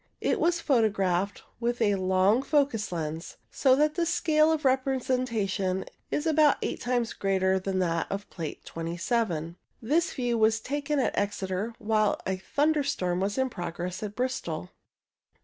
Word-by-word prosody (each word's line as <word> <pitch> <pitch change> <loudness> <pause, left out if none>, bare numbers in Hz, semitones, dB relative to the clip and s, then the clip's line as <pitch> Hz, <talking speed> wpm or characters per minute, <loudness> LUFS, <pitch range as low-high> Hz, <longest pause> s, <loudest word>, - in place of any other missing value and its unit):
It - - 0
was 345 0 +2
photographed 205 - +1 0.2
with 240 0 -1
a 210 -3 +3
long 190 +4 +3
focus 275 -8 +1
lens, 160 -1 -4
so 260 -2 +4
that 300 +2 +2
the 340 0 0
scale 315 -2 +3
of 310 -2 -1
representation 250 -8 0 0.2
is 295 - -1
about 310 -2 +4
eight - - -3
times 245 -2 0
as - - -6
great 195 -1 0
as 190 0 +3
that 185 -4 0
of 200 +1 -4
Plate 160 -4 -6
2 165 +1 -5
7. 170 -5 -1 0.2
This 310 +9 +1
view 240 -2 -1
was 220 0 +4
taken 290 +5 -2
at 265 - +1
Exeter 200 +2 -2
while 215 -1 +1
a 190 0 -1
thunderstorm 280 - 0
was 200 +4 -1
in 260 -1 +1
progress 175 0 -5
at 210 -1 -5
Bristol. 255 +1 -3
220 Hz, 155 wpm, -28 LUFS, 190-270 Hz, 0.2 s, so